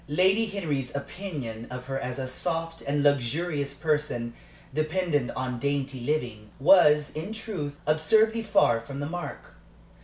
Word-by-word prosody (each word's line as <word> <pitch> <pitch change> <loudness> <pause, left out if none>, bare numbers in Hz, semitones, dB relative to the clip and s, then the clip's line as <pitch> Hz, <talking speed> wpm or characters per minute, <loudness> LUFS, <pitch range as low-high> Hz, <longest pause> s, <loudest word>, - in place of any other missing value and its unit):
Lady 190 +8 +3
Henry's 150 -11 -3
opinion 140 - -5
of 125 0 -6
her 135 0 -2
as 125 -2 -4
a 130 -1 -3
soft 165 +4 -2
and 145 +1 0
luxurious 145 +1 +1
person 150 -6 -1 0.4
dependent 155 -2 0
on 130 -2 -2
dainty 140 -1 -1
living 120 -6 -2
was, 150 -2 +6
in 160 +7 -5
truth, 185 -10 -4
absurdly 220 +9 +3
far 200 - +3
from 135 +4 -7
the 145 - -2
mark. 175 +2 -6
145 Hz, 140 wpm, -27 LUFS, 130-175 Hz, 0.4 s, was